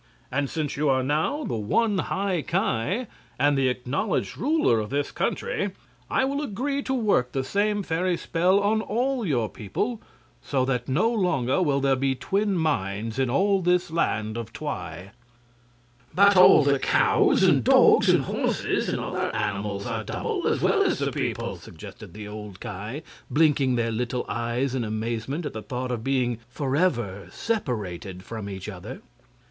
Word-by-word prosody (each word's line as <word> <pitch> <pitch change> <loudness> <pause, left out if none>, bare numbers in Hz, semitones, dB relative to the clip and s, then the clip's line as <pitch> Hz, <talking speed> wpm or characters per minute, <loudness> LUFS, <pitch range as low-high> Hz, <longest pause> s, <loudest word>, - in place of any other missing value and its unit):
And 140 +1 0
since 155 -3 -3
you 150 0 +1
are 130 -1 +2
now 155 - 0
the - - -2
one 200 - +1
High 190 -4 -1
Ki, 190 - -1 0.3
and 145 +2 +3
the 135 -1 +2
acknowledged 125 - -2
ruler 290 - +2
of 105 -1 -4
this 140 +1 -1
country, 200 -1 -2 0.4
I 265 - +2
will 280 +2 -1
agree 280 +3 -2
to 265 - -2
work 200 - +1
the 135 - 0
same 205 +7 0
fairy 175 +1 0
spell 180 +5 +2
on 215 +2 +2
all 245 +1 -1
your 120 -7 +1
people, 210 - -3 0.4
so 130 -3 0
that 125 -2 -1
no 180 - +2
longer 175 - +1
will 145 -5 +2
there 135 -1 +2
be 135 0 0
twin 195 +6 0
minds 115 - -1
in 130 -2 +1
all 195 +8 +2
this 180 -1 +1
Land 110 -9 -1
of 115 -1 -6
Twi." 90 - -6 1.0
"But 200 +2 +6
all 180 -4 +8
the 140 -1 +2
cows - - +3
and - - +4
dogs - - +6
and - - +4
horses - - -1
and - - -1
other - - -2
animals 105 -1 -2
are - - -3
double, - - -2
as - - +1
well - - +3
as - - +2
the - - -1
people," - - -3
suggested - - -11
the 105 -1 -7
old 105 -2 -8
Ki, 105 - -6 0.3
blinking 145 -4 +3
their 115 -1 0
little 125 +2 -2
eyes 120 +3 -1
in 130 -2 -1
amazement 115 +7 -3
at 145 - -4
the 110 - -5
thought 125 +2 -4
of 115 -2 -3
being 125 -3 0
forever 130 - -1
separated 100 - -3
from 110 -2 -6
each 95 0 -7
other. 105 +5 -8
135 Hz, 165 wpm, -25 LUFS, 115-185 Hz, 1.0 s, all